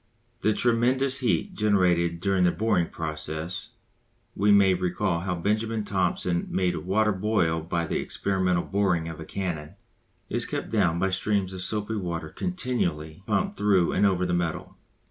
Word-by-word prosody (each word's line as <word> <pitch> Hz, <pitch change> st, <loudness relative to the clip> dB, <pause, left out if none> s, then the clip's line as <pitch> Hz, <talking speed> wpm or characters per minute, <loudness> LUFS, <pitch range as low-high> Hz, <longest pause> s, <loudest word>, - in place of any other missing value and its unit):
The 110 Hz, -, +2 dB
tremendous 125 Hz, +4 st, +2 dB
heat 125 Hz, -3 st, 0 dB
generated 90 Hz, -5 st, +2 dB
during 95 Hz, -1 st, +2 dB
the 90 Hz, -, +4 dB
boring 95 Hz, -3 st, +1 dB
processes 80 Hz, +1 st, -5 dB, 0.6 s
we 105 Hz, +1 st, +3 dB
may 100 Hz, -2 st, +6 dB
recall 90 Hz, -1 st, 0 dB
how 90 Hz, +1 st, -2 dB
Benjamin 110 Hz, +5 st, -1 dB
Thompson 90 Hz, -3 st, 0 dB
made 90 Hz, -2 st, 0 dB
water 105 Hz, +5 st, +1 dB
boil 95 Hz, -5 st, +1 dB
by 85 Hz, +1 st, -2 dB
the -, -, -1 dB
experimental 95 Hz, -3 st, 0 dB
boring 95 Hz, -5 st, 0 dB
of 80 Hz, -1 st, -7 dB
a 80 Hz, -, -7 dB
cannon 80 Hz, -5 st, -4 dB, 0.5 s
is -, -, -1 dB
kept -, -, -4 dB
down 95 Hz, -7 st, +2 dB
by 95 Hz, +2 st, +1 dB
streams 95 Hz, 0 st, 0 dB
of 95 Hz, -, -5 dB
soapy 105 Hz, +3 st, -2 dB
water 85 Hz, -5 st, -4 dB
continually 85 Hz, -, -2 dB
pumped -, -, 0 dB
through 100 Hz, -4 st, +3 dB
and 105 Hz, -, +3 dB
over 90 Hz, -2 st, +1 dB
the 90 Hz, -, -1 dB
metal. 85 Hz, -2 st, -2 dB
95 Hz, 155 wpm, -26 LUFS, 85-105 Hz, 0.6 s, may